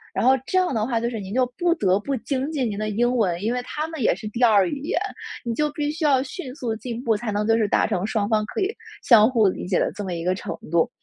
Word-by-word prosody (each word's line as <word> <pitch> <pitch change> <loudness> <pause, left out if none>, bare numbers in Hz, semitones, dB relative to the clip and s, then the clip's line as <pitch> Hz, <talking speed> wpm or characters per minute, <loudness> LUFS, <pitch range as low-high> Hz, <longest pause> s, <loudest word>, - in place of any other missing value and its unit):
然 - - +1
后 260 +1 +6
这 375 - +1
样 365 -5 +2
的 220 -3 0
话 235 -3 0
就 235 - -1
是 225 - -4
您 195 -1 -7
就 255 +3 +2
不 345 -1 +3
得 190 - +2
不 275 +6 -2
精 270 +4 -2
进 275 -6 0
您 205 - -4
的 215 0 -2
英 240 +4 +1
文。 185 -8 +1
因 225 +3 0
为 250 - -1
他 300 +5 -4
们 320 -3 -6
也 215 - +3
是 215 +3 -7
第 230 +3 -5
2 210 -5 +6
语 280 - -4
言， 300 +8 -1 0.5
你 235 - -1
就 300 +5 0
必 295 0 -2
须 315 +2 -5
要 270 -4 +4
迅 270 -1 -7
速 235 -5 -3
进 235 +1 -6
步， 225 -3 +2
才 215 +1 -3
能 205 +1 -1
就 225 - +4
是 220 -2 +2
达 - - +2
成 180 +1 -1
双 215 -2 0
方 215 -1 +2
可 - - -5
以， 395 +3 -1 0.3
相 225 -2 +7
互 230 -5 +3
理 185 - -3
解 180 - +1
的 - - 0
这 205 - -6
么 185 -2 -4
一 165 -1 -4
个 180 +1 +1
程 170 -3 -5
度。 170 -1 +3
230 Hz, 315 characters per minute, -23 LUFS, 210-270 Hz, 0.5 s, 相